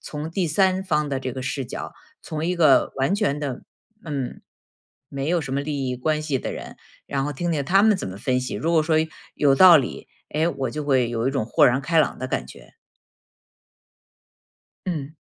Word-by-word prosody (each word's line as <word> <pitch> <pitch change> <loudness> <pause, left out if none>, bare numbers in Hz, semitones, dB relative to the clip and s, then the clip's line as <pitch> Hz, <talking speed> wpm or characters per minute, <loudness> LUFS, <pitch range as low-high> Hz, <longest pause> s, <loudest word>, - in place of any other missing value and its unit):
从 150 +2 -6
第 180 0 -1
3 190 +3 +2
方 150 -5 0
的 135 -1 -2
这 130 -2 -4
个 130 0 -5
视 130 +2 -3
角， 120 - -7 0.3
从 155 0 -4
一 180 +1 0
个 150 -6 +4
完 135 +8 +1
全 205 -9 0
的 140 -4 -4 0.4
嗯， 140 -5 -4 0.7
没 140 +1 -4
有 175 0 +2
什 135 -3 -6
么 140 - 0
利 140 -2 -3
益 125 - -2
关 155 +4 0
系 145 -4 -1
的 - - -4
人， - - -8 0.3
然 135 -1 -1
后 145 - -2
听 175 +5 -2
听 145 -3 -1
他 195 +7 +4
们 215 -2 +5
怎 140 - -5
么 95 - -8
分 125 +4 0
析。 125 - -4
如 165 +2 -1
果 160 -2 +4
说 160 0 +1 0.4
有 140 -2 +3
道 175 +3 +9
理， 135 -5 -3 0.2
诶， 160 +3 +1
我 140 -4 -3
就 150 -1 -4
会 130 -4 +2
有 115 +2 -1
一 - - +1
种 135 -5 -1
豁 - - +4
然 125 +2 +2
开 165 +3 +1
朗 150 - 0
的 130 - -3
感 - - -2
觉。 - - -15 2.1
嗯。 155 -3 -4
145 Hz, 220 characters per minute, -23 LUFS, 130-160 Hz, 2.1 s, 道